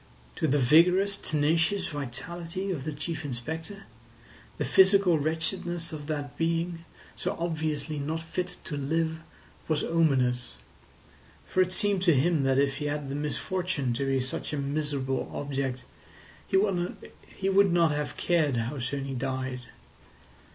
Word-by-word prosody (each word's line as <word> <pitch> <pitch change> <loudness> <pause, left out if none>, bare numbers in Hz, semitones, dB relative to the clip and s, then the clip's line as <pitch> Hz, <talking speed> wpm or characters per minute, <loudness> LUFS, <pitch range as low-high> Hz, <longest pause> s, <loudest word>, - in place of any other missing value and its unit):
To 160 - +1
the 145 +1 +3
vigorous, 180 +9 +5
tenacious 165 +4 +1
vitality 165 +7 -4
of 145 -7 -4
the 155 - -2
Chief 160 +2 -4
Inspector, 160 +9 -5 0.7
the - - -1
physical 190 -3 +5
wretchedness 165 +2 -2
of 145 -2 -6
that 145 -4 -3
being, 165 +1 -1 0.3
so - - -3
obviously 155 -3 -2
not 155 +3 -2
fit 180 +2 -3
to 150 - -4
live, 160 +3 0 0.5
was 155 -2 +1
ominous; 130 -7 +2 0.9
for 185 - +2
it 185 0 +2
seemed 200 +1 +2
to 170 -5 +5
him 155 +3 +3
that 135 0 +3
if 140 0 +2
he 150 - -3
had 145 -1 -2
the 135 - -3
misfortune 150 -1 -1
to 135 +3 -1
be 135 0 +2
such 130 +3 -4
a - - -1
miserable 140 -2 -1
object 135 -3 -3 0.6
he 190 - +3
would 195 0 0
not 170 -2 +4
have 150 0 -3
cared 155 -7 +2
how 120 +5 -2
soon 135 +2 -2
he 135 - -4
died. 130 0 -3
155 Hz, 145 wpm, -28 LUFS, 140-175 Hz, 0.9 s, vigorous